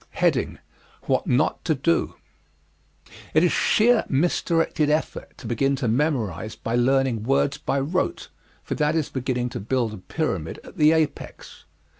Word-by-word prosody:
What - - 0
Not 130 +5 +1
to 160 - +2
Do 165 +5 0 1.2
It 155 - +5
is 180 - +3
sheer 230 +1 +3
misdirected 165 +1 +1
effort 155 +1 -2
to - - -12
begin 135 +5 +1
to 130 -2 -2
memorize 110 - -1
by 115 +1 -3
learning 130 -1 +2
words 135 +4 +1
by 140 - -1
rote, 180 - -2 0.3
for - - -4
that 150 +1 +1
is 160 -3 0
beginning 125 -2 -2
to - - -6
build 115 +1 -1
a - - -7
pyramid 95 - -3
at - - -14
the 155 0 +5
apex. 160 -2 -3
135 Hz, 145 wpm, -24 LUFS, 120-155 Hz, 1.2 s, It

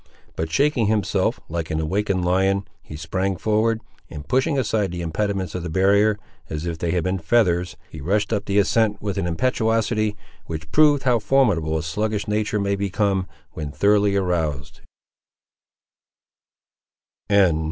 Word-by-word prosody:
But 80 0 -3
shaking 140 - +2
himself, 105 -3 0
like 80 -1 -4
an 80 -1 -1
awakened 95 +3 -1
lion, 95 +2 +1 0.2
he 75 - -10
sprang 95 +5 -2
forward, 110 +4 +1 0.3
and 75 0 -9
pushing 130 +4 +1
aside 110 -5 0
the 90 -1 -4
impediments 95 +1 -2
of 90 - -3
the 85 - -5
barrier, 100 +4 +3 0.3
as 75 +1 -4
if 85 -2 -4
they 85 - -2
had 85 0 0
been 95 +2 -1
feathers, 90 -1 +1
he - - -10
rushed 105 +8 0
up 105 -1 -1
the 100 0 0
ascent 105 +1 +2
with 100 -1 -3
an 90 - -1
impetuosity 110 +1 0 0.3
which 80 -1 -6
proved 150 -2 +4
how 125 -3 +3
formidable 100 - +2
a 80 - -3
sluggish 105 +6 -2
nature 105 0 0
may 100 0 0
become, 100 -1 0 0.2
when 75 -2 -5
thoroughly 100 +3 +3
aroused. 80 -7 -2
100 Hz, 150 wpm, -22 LUFS, 85-110 Hz, 0.3 s, proved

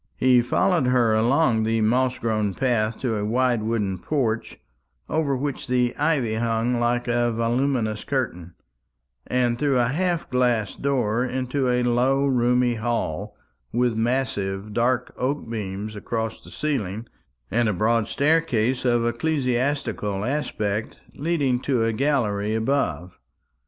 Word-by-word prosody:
He 125 -1 +5
followed 135 +4 +1
her 125 -3 +3
along 120 +2 +3
the 115 +1 +1
moss 125 +4 +2
grown 110 -4 -1
path 115 -4 0
to 115 -4 0
a 105 - -2
wide 120 +2 +1
wooden 105 -4 -1
porch, 115 - -2 0.5
over 150 -4 0
which 140 0 -4
the 125 -1 +1
ivy 145 -7 +1
hung 115 +1 0
like 120 +1 0
a 120 0 +1
voluminous 115 -1 0
curtain, 90 -11 -3 0.7
and 120 -1 +1
through 140 -2 +2
a 120 -1 +2
half 175 +4 -1
glass 120 -5 +1
door 125 -4 0
into 130 +1 -1
a 125 0 +2
low 130 +3 +2
roomy 125 -2 +2
hall, 115 -8 -3 0.3
with 120 0 +1
massive 110 -4 -1
dark 125 +2 0
oak 135 +2 -2
beams 105 -1 -5
across 110 +2 -3
the - - -14
ceiling, 115 -8 -3 0.5
and 120 0 +2
a - - 0
broad 110 +3 +1
staircase 140 -5 +1
of 120 -2 +2
ecclesiastical 125 -5 -1
aspect 110 -6 -2
leading 145 -5 0
to 125 -3 0
a 115 - 0
gallery 110 -6 0
above. 95 - -1
120 Hz, 135 wpm, -24 LUFS, 110-130 Hz, 0.7 s, He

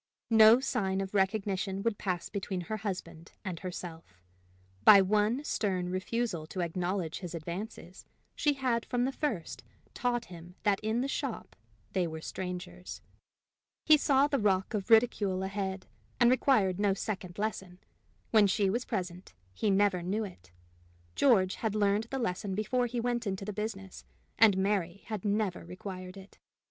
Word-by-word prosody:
No 220 +1 +8
sign 195 -7 -1
of 195 0 -4
recognition 195 0 0
would 230 -2 0
pass 180 -3 -2
between 190 -2 -4
her 215 +5 -4
husband 180 -5 -6
and 180 -3 -4
herself: 165 - -8 0.6
by 200 - +10
one 210 +7 +2
stern 185 -9 -1
refusal 185 -2 -2
to 185 - -4
acknowledge 175 0 -2
his 175 -2 -6
advances, 175 +2 -7 0.3
she 295 - +2
had 255 -4 0
from 245 0 0
the 265 - 0
first 170 - -3 0.3
taught 240 -1 -1
him 175 0 -12
that 205 -2 +2
in 220 +2 0
the 270 - -1
shop 275 -3 -4 0.4
they 180 -2 +1
were 160 -1 -6
strangers: 180 +1 -6 0.9
he 310 - +8
saw 280 -2 +3
the 285 -2 0
rock 195 -1 +1
of 205 0 -3
ridicule 215 -5 +3
ahead, 190 -1 -3 0.3
and 240 0 +6
required 210 -8 +3
no 200 -2 +2
second 195 -4 -5
lesson: 195 -4 -3 0.5
when 215 -2 +6
she 195 0 +2
was 240 +4 -1
present, 180 - -5 0.2
he 210 - 0
never 195 -2 +3
knew 200 +6 -1
it. 135 - -10 0.6
George 190 - +4
had 220 -2 -2
learned 205 +1 +2
the 270 +4 -4
lesson 195 -4 -2
before 245 +4 0
he 240 0 -3
went 240 -1 -1
into 195 0 -3
the 210 - -4
business, 195 -3 -5 0.4
and 215 -4 +6
Mary 190 -2 0
had 215 -4 -5
never 205 -3 0
required 185 +1 -8
it. 195 +1 -14
195 Hz, 155 wpm, -30 LUFS, 185-220 Hz, 0.9 s, by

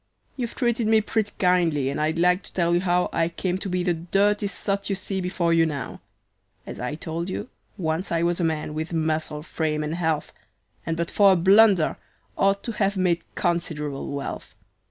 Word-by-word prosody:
"You've 240 -4 -4
treated 235 -3 0
me 220 0 +5
pretty 215 -1 -1
kindly 170 -7 +2
and 145 - -3
I'd 155 +2 0
like 180 +2 +3
to - - -14
tell 170 -2 +1
you 175 - +3
how 180 -1 +2
I 165 0 +1
came 185 +2 -2
to 195 - -4
be 180 0 0
the 175 -1 +2
dirty 200 +5 +1
sot 200 0 -3
you 195 - +1
see 190 0 -3
before 180 -2 0
you 165 0 +5
now. 140 -5 -5 0.6
As - - -8
I 125 +4 -3
told 165 +2 -4
you, 210 +5 -4 0.3
once 165 0 -2
I 165 0 +1
was 175 +1 +1
a - - 0
man, 155 -2 -1
with 160 +2 -4
muscle, 155 -2 -1
frame, 155 -2 -2
and 150 +1 -3
health, 160 -3 -1 0.5
And 165 0 -1
but 170 0 -2
for 200 -2 +6
a - - +3
blunder 190 -1 +5 0.4
ought 195 0 +2
to 235 - -2
have 200 -2 0
made 175 -2 +2
considerable 150 -5 -2
wealth. 140 -1 -6
175 Hz, 195 wpm, -24 LUFS, 160-195 Hz, 0.6 s, for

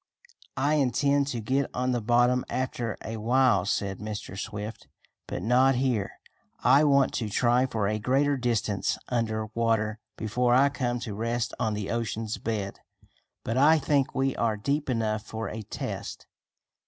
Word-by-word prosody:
"I 140 +3 +2
intend 140 +2 +2
to 125 -4 -3
get 130 +5 0
on 125 +1 0
the 120 -1 0
bottom 120 +2 +3
after 120 -3 -2
a 115 0 -4
while," 115 -4 +3
said 95 -2 -1
Mr. 105 -3 -6
Swift, 105 +2 -6 0.4
"but - - -4
not 130 +3 +4
here. 120 -6 0 0.5
I 135 +4 +6
want 140 -2 +4
to 110 -3 -2
try 120 +4 +2
for 110 -5 -1
a 110 +1 -1
greater 135 +6 +2
distance 115 -6 0
under 110 -3 -1
water 110 -2 0 0.2
before 120 +3 +1
I 140 +2 +5
come 125 -3 -2
to 110 - -5
rest 115 +3 -2
on 110 -1 0
the 105 -1 -4
ocean's 115 -1 -2
bed. 105 -3 -3 0.6
But 115 - -2
I 155 +4 +6
think 145 -1 +1
we 135 0 +1
are 110 -2 +1
deep 140 +6 -1
enough 110 -3 0
for 110 0 -4
a 110 - -5
test. 105 - -6
120 Hz, 160 wpm, -27 LUFS, 110-130 Hz, 0.6 s, I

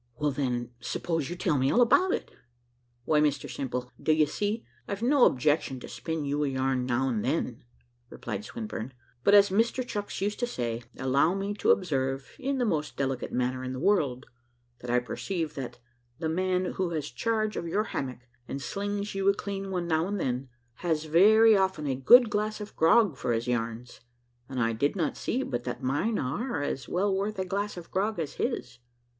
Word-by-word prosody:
"Well, 150 +3 0
then 125 -3 -2
suppose 160 +3 -2
you 175 - -4
tell 170 -5 +1
me 130 +1 +2
all - - +3
about 365 +10 +5
it." - - -2 0.7
"Why, 150 -1 +3
Mr 150 -2 +1
Simple, 125 -2 -4
d'ye 155 -1 +4
see, 210 +8 -2 0.2
I've 200 +3 -4
no 265 +1 +5
objection 135 0 +1
to - - -9
spin 160 -3 -4
you 145 +1 0
a - - +1
yarn 130 -1 0
now 130 +2 +1
and 110 -4 -1
then," - - -1 0.5
replied 105 -1 -5
Swinburne; 135 - -6 0.3
"but 200 - +6
as 200 -1 +7
Mr 230 +5 +1
Chucks 205 -3 -4
used 205 +2 -1
to 245 - 0
say, 120 - -3 0.2
allow 140 +7 +2
me 200 +1 -2
to 205 - -1
observe, 135 -6 +1
in 275 0 -1
the 250 - +1
most 155 -8 -1
delicate 135 -2 -2
manner 125 +1 -1
in 130 0 -4
the 130 - -5
world, 145 -8 +1 0.5
that 125 - -8
I 120 - +3
perceive 160 +6 -3
that 135 -3 -6 0.4
the 160 0 -2
man 185 +2 +1
who 185 0 -1
has 155 -4 -3
charge 220 -2 -1
of 170 - -3
your 205 +6 +1
hammock, 130 - -4 0.3
and 140 - -4
slings 205 +5 -3
you 195 0 +2
a 200 - +3
clean 195 -1 -4
one 180 -2 -2
now 160 +1 +1
and 205 0 -2
then, 130 -2 -2 0.3
has 160 -3 0
very 215 +8 +6
often 190 -5 +1
a 135 - 0
good 230 - +7
glass 215 +1 -1
of 210 0 -8
grog 165 - +4
for 120 - -1
his 115 +1 -1
yarns, 115 0 -3 0.5
and 130 -2 -3
I 115 -1 +2
do 140 +6 +1
not 170 -5 -1
see 260 +3 -1
but 120 - -3
that 125 +1 -4
mine 145 - 0
are 155 - -2
as 135 -3 -3
well 195 +2 +1
worth 205 +2 -2
a 190 - -1
glass 200 +1 -2
of 170 - -9
grog 205 +2 0
as 160 -4 -3
his." 125 - -3
160 Hz, 195 wpm, -28 LUFS, 130-205 Hz, 0.7 s, as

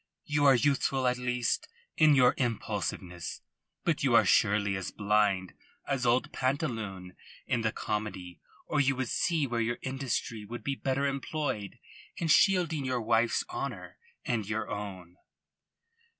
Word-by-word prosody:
You 145 -1 +1
are 135 -1 +7
youthful 135 0 +1
at 125 0 +1
least 125 -1 -1 0.3
in 155 -2 +6
your 125 -2 +5
impulsiveness, 90 - -3 0.4
but - - 0
you - - +3
are - - +6
surely 100 -1 +3
as 95 -1 -3
blind 105 -3 +1 0.3
as 130 -3 -1
old 120 +2 +2
Pantaloon 110 - -2 0.3
in 120 - 0
the 110 -1 +1
comedy 105 -6 -4 0.3
or 150 - 0
you 135 -1 +2
would 130 -2 -2
see 165 -4 +1
where 120 -3 -1
your 115 +1 -1
industry 130 -4 -3
would 120 +4 -8
be 140 - -1
better 135 +1 -1
employed 140 -6 -3 0.4
in 165 - -2
shielding 170 -4 +4
your 130 -1 -1
wife's 115 +1 +2
honour 360 0 -6 0.3
and 115 -5 -1
your 110 0 -2
own." 95 -4 -6
120 Hz, 145 wpm, -30 LUFS, 105-135 Hz, 0.4 s, are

